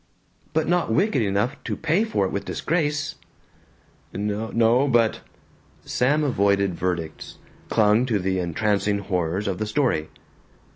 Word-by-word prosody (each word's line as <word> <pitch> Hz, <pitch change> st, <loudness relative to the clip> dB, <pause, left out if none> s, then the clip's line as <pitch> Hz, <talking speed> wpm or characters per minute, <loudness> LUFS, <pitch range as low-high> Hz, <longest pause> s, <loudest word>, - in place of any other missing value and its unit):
"But 160 Hz, 0 st, +1 dB
not 175 Hz, -8 st, +1 dB
wicked 165 Hz, -, +2 dB
enough 105 Hz, +6 st, -1 dB
to -, -, -3 dB
pay 165 Hz, +6 st, +1 dB
for 215 Hz, -, 0 dB
it -, -, -3 dB
with 100 Hz, 0 st, -3 dB
disgrace?" 150 Hz, -, -1 dB, 1.0 s
"N 100 Hz, -, -4 dB, 0.3 s
no, 120 Hz, +4 st, +3 dB
but 120 Hz, -4 st, +2 dB, 0.3 s
" -, -, -32 dB
Sam 145 Hz, +5 st, +1 dB
avoided 100 Hz, -7 st, +2 dB
verdicts, 85 Hz, -3 st, -4 dB, 0.3 s
clung 110 Hz, +3 st, +3 dB
to 115 Hz, -4 st, +1 dB
the 95 Hz, 0 st, -1 dB
entrancing 100 Hz, +3 st, 0 dB
horrors 95 Hz, 0 st, -2 dB
of 95 Hz, -2 st, -2 dB
the 110 Hz, -, -2 dB
story. 115 Hz, -, 0 dB
110 Hz, 140 wpm, -24 LUFS, 100-140 Hz, 1.0 s, no